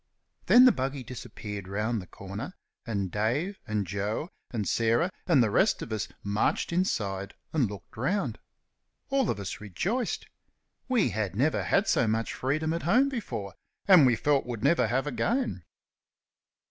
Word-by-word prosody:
Then 250 +1 +8
the 255 - +8
buggy 135 - -3
disappeared 105 -5 -7
round 105 +3 -1
the 90 - -12
corner, 100 - -7 0.3
and 100 -5 -2
Dave 135 - -1
and 105 -2 -1
Joe 105 - -3 0.2
and 110 -4 -3
Sarah 115 +11 +2 0.2
and 150 -9 +5
the 110 - 0
rest 190 - +3
of 110 - -5
us 110 - -2 0.2
marched 105 +10 0
inside 100 - -1 0.2
and 135 -9 +2
looked 100 -1 -10
round. 180 - -1 0.7
All 270 -5 +2
of 105 - -1
us 100 +1 -5
rejoiced. 195 - -2 0.6
We 240 - +3
had 100 -2 -2
never 140 +8 +2
had 195 - +2
so 120 - +3
much 110 +1 0
freedom 155 +5 -1
at 170 - -2
home 255 - +3
before, 195 - -5 0.3
and 180 -9 +8
we 120 - +4
felt 140 +2 +1
would 115 -3 -5
never 160 +5 +4
have 130 +3 0
again. 145 - -1
120 Hz, 160 wpm, -28 LUFS, 105-170 Hz, 0.7 s, Then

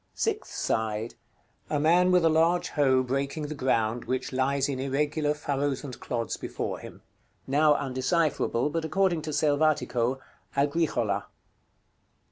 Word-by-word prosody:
Sixth 440 -1 -2
side. 110 0 -1 0.6
A 150 - 0
man, 175 +4 +4
with 180 -2 +4
a - - +7
large 165 +3 +2
hoe, 130 -3 +3
breaking 140 +4 -2
the - - -3
ground, 120 -4 0
which 130 +1 -3
lies 135 +1 +1
in 135 -2 -3
irregular 145 +2 0
furrows 140 -2 -2
and 130 -4 -8
clods 115 -2 -3
before - - -4
him. - - -12 0.4
Now 150 +2 +4
undecipherable, 135 0 0
but 165 +1 -1
according 175 0 +1
to 155 - -6
Selvatico, 145 -5 +1 0.4
"AGRICHOLA." 140 -9 0
140 Hz, 130 wpm, -27 LUFS, 130-155 Hz, 0.6 s, a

